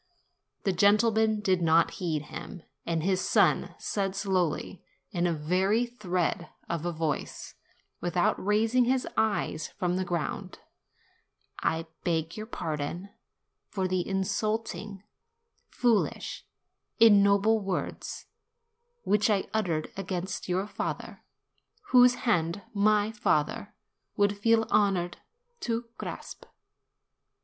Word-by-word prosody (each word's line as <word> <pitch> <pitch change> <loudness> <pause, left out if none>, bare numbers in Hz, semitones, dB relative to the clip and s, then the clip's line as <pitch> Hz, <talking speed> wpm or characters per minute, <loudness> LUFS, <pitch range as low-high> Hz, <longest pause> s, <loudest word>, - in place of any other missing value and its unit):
The 195 - +1
gentleman 215 +3 +3
did 190 -4 +2
not 165 0 +4
heed 160 -4 -1
him, 170 +3 -9 0.2
and 165 -2 0
his 185 0 +1
son - - +2
said 195 -2 -2
slowly, 190 -3 -1 0.3
in 175 -3 +1
a - - +1
very 185 +9 +1
thread 180 -7 -2 0.2
of 170 0 -2
a - - 0
voice, 160 -2 -3 0.5
without 175 0 0
raising 225 +5 +3
his 255 +1 +1
eyes 205 -8 0
from 180 -2 -2
the 185 - 0
ground, 175 -3 -3 1.0
"I 165 0 0 0.2
beg 165 -1 -1
your 215 0 -6
pardon 165 -1 -4 0.6
for 190 -2 -1
the 185 -1 -1
insulting 205 +1 -2 0.7
foolish 235 -4 0 0.5
ignoble 205 0 +6
words 195 -3 -4 0.8
which 210 +1 +2
I 200 -3 +2
uttered 175 -8 -1
against 185 0 -4
your 185 +2 0
father, 210 - -5 0.7
whose 250 -1 +7
hand 175 -4 +1
my 210 +1 +3
father 205 0 0 0.4
would 205 0 +3
feel 225 +2 +3
honored 185 -4 +2 0.4
to 230 0 -3
grasp." - - -7
195 Hz, 110 wpm, -28 LUFS, 175-215 Hz, 1.0 s, whose